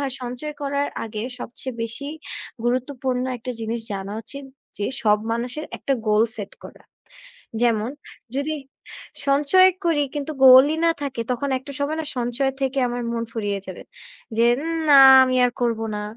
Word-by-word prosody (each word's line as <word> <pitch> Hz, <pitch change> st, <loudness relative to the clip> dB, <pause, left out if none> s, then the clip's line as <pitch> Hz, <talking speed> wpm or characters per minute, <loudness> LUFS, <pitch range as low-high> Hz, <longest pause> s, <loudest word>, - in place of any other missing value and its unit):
হয় 275 Hz, -2 st, -2 dB
সঞ্চয় 250 Hz, +5 st, -5 dB
করার 280 Hz, 0 st, -1 dB, 0.2 s
আগে 215 Hz, -1 st, -5 dB, 0.2 s
সবচেয়ে 250 Hz, +1 st, -7 dB
বেশি 230 Hz, +5 st, -5 dB, 0.6 s
গুরুত্বপূর্ণ 255 Hz, 0 st, -1 dB
একটা 245 Hz, +2 st, -6 dB
জিনিস 225 Hz, +1 st, -3 dB
জানা 195 Hz, 0 st, -5 dB
উচিত, 280 Hz, +5 st, -10 dB, 0.3 s
যে 205 Hz, -, -1 dB, 0.2 s
সব 210 Hz, -1 st, +4 dB
মানুষের 245 Hz, +6 st, -3 dB
একটা 275 Hz, -, -1 dB, 0.2 s
গোল 210 Hz, +1 st, +4 dB
সেট 205 Hz, -2 st, -7 dB
করা। -, -, -16 dB, 0.8 s
যেমন 230 Hz, -1 st, +2 dB, 0.5 s
যদি, 310 Hz, +2 st, -1 dB, 0.7 s
সঞ্চয় 295 Hz, +7 st, +5 dB, 0.2 s
করি 310 Hz, -4 st, +2 dB
কিন্তু 290 Hz, +1 st, -3 dB
গোলই 260 Hz, +4 st, +8 dB
না 335 Hz, -, +5 dB
থাকে 270 Hz, -4 st, -3 dB
তখন 260 Hz, +3 st, -2 dB
একটা 265 Hz, +2 st, -10 dB
সময় 295 Hz, +3 st, -1 dB
না -, -, -7 dB
সঞ্চয় 245 Hz, +3 st, 0 dB
থেকে 270 Hz, 0 st, -1 dB
আমার 245 Hz, 0 st, -3 dB
মন 230 Hz, 0 st, -2 dB
ফুরিয়ে 205 Hz, -3 st, -2 dB
যাবে। 185 Hz, -, -8 dB, 0.5 s
যে 230 Hz, -, +4 dB, 0.2 s
উম 330 Hz, +1 st, -2 dB
না 280 Hz, -1 st, +9 dB, 0.2 s
আমি 255 Hz, 0 st, 0 dB
আর 245 Hz, -, 0 dB
করব 230 Hz, -2 st, +1 dB, 0.2 s
না, 210 Hz, -, -4 dB
255 Hz, 160 wpm, -22 LUFS, 230-280 Hz, 0.8 s, না